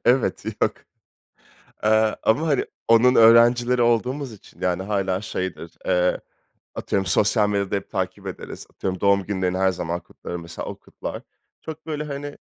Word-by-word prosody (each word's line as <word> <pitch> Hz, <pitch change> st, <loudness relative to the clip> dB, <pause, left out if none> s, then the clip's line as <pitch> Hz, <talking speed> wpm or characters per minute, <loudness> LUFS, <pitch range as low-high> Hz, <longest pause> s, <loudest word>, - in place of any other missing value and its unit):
Evet, 125 Hz, 0 st, +2 dB, 0.2 s
yok. -, -, +3 dB, 1.1 s
Eee, 110 Hz, 0 st, +3 dB
ama, 145 Hz, +9 st, +2 dB
hani, 140 Hz, -4 st, +2 dB, 0.2 s
onun 115 Hz, +3 st, +6 dB
öğrencileri 120 Hz, +2 st, +6 dB
olduğumuz 125 Hz, +3 st, +1 dB
için, 105 Hz, -, -16 dB
yani, 90 Hz, 0 st, 0 dB
hâlâ 95 Hz, -2 st, -1 dB
şeydir, 95 Hz, -5 st, -5 dB
eee, 90 Hz, -1 st, +2 dB, 0.6 s
atıyorum, 95 Hz, -1 st, -1 dB
sosyal 105 Hz, +3 st, +3 dB
medyada 100 Hz, -1 st, 0 dB
hep 100 Hz, -, -4 dB
takip -, -, -3 dB
ederiz, -, -, -7 dB
atıyorum, 95 Hz, -2 st, -3 dB
doğum 100 Hz, -1 st, +3 dB
günlerini 95 Hz, -2 st, -1 dB
her 95 Hz, 0 st, +3 dB
zaman 85 Hz, -1 st, -3 dB
kutlarım, 85 Hz, +1 st, -8 dB
mesela 85 Hz, 0 st, -7 dB
o -, -, -5 dB
kutlar. -, -, -8 dB, 0.4 s
Çok 160 Hz, 0 st, -8 dB
böyle, 150 Hz, -1 st, -3 dB
hani, 145 Hz, -1 st, -6 dB
105 Hz, 150 wpm, -23 LUFS, 95-120 Hz, 1.1 s, onun